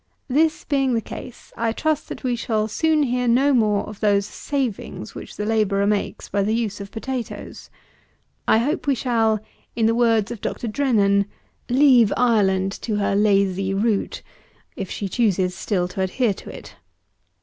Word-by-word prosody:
This 315 +4 +2
being 270 -3 +1
the - - +2
case, 235 +2 -10
I 230 -1 0
trust 310 +3 -1
that - - -7
we 250 -2 0
shall 220 -2 -1
soon 310 +7 +2
hear 250 -2 0
no 265 +4 +4
more 215 -4 +2
of 210 -1 -9
those 200 -2 +2
savings 230 - -4
which - - -9
the 210 - -2
labourer 210 -2 +1
makes 205 0 -1
by 200 - 0
the 215 +3 +1
use 215 -3 -2
of 200 - -7
potatoes; 245 +3 -6 0.8
I - - +5
hope 290 +8 -1
we 280 - +3
shall, 225 -3 +1 0.4
in 230 - +1
the 225 - +3
words 230 -2 +2
of 235 - -7
Dr. 240 - -3
DRENNAN, 210 -5 +2 0.4
"leave 250 -5 +5
Ireland 195 -6 +2
to 220 - -2
her 200 -1 0
lazy 195 -2 +2
root," 210 0 -1 0.5
if 195 - -5
she 200 - -3
choose 210 -1 +1 0.2
still 180 -2 -1
to 190 - -4
adhere 205 +4 +1
to - - -11
it. - - -11
220 Hz, 170 wpm, -22 LUFS, 200-250 Hz, 0.8 s, I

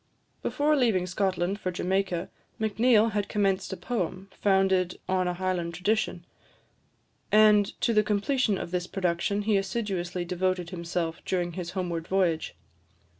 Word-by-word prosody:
Before 300 +1 +1
leaving 225 -10 +2
Scotland 185 +1 -1
for 185 - -2
Jamaica, 185 -1 -1 0.3
Macneill 220 +1 +3
had 205 -1 -2
commenced 195 -2 0
a 190 - -4
poem, 190 -1 -3
founded 190 -2 +2
on 185 -1 +1
a 180 - -1
Highland 175 -2 -2
tradition; 180 -1 -1 1.1
and 210 -1 +5
to 235 - +2
the 215 - +5
completion 210 +1 +1
of 170 - -5
this 180 -1 -2
production 190 +2 -1
he 210 -1 +2
assiduously 190 -3 -2
devoted 180 0 -1
himself 170 -2 -3
during 175 -2 -1
his 170 0 -5
homeward 170 -3 -2
voyage. 180 -4 0
190 Hz, 135 wpm, -27 LUFS, 180-205 Hz, 1.1 s, and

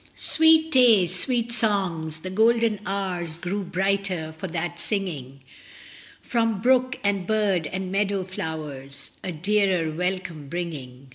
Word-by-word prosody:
Sweet 320 0 +4
day, 240 - +6
sweet 235 +7 -1
songs. 180 -9 -1
The 185 - -6
golden 225 +1 +3
hours 180 -4 -3
Grew 185 +4 -3
brighter 185 -3 -1
for 175 +4 -5
that 175 0 -4
singing, 155 - -4 0.8
From 225 -4 0
brook, 255 +2 +3
and 200 -3 0
bird, 200 -7 +1
and 190 +1 -4
meadow 200 -1 0
flowers 145 -6 -6
A 185 - -3
dearer 185 -1 +1
welcome 175 -3 -3
bringing. 140 -6 -6
185 Hz, 125 wpm, -25 LUFS, 160-210 Hz, 0.8 s, day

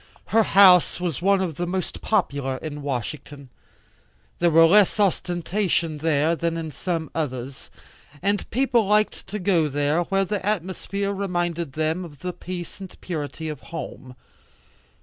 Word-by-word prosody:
Her 225 - +6
house 190 -5 +6
was 175 -4 -3
one 195 +1 +3
of 165 -6 -3
the 175 - -2
most 185 +1 -3
popular 140 -10 0
in 150 0 -6
Washington. 140 +1 -5 0.9
There 175 - +4
was 165 0 +7
less 210 +1 +5
ostentation 175 -3 0
there 155 +1 +2
than 165 0 -2
in 160 -1 -4
some 160 +2 -3
others, 130 -4 -4 0.5
and 200 +4 -1
people 245 -3 +2
liked 210 +1 +1
to 210 - -4
go 175 -5 +2 0.4
where 195 +1 +1
the 200 +1 -3
atmosphere 200 0 -2
reminded 175 -6 -2
them 160 +4 -1
of 145 -5 -12
the 180 0 -3
peace 175 0 -7
and 190 -2 -10
purity 160 -2 -5
of 150 -3 -5
home. 130 -5 -8
175 Hz, 145 wpm, -24 LUFS, 155-195 Hz, 0.9 s, was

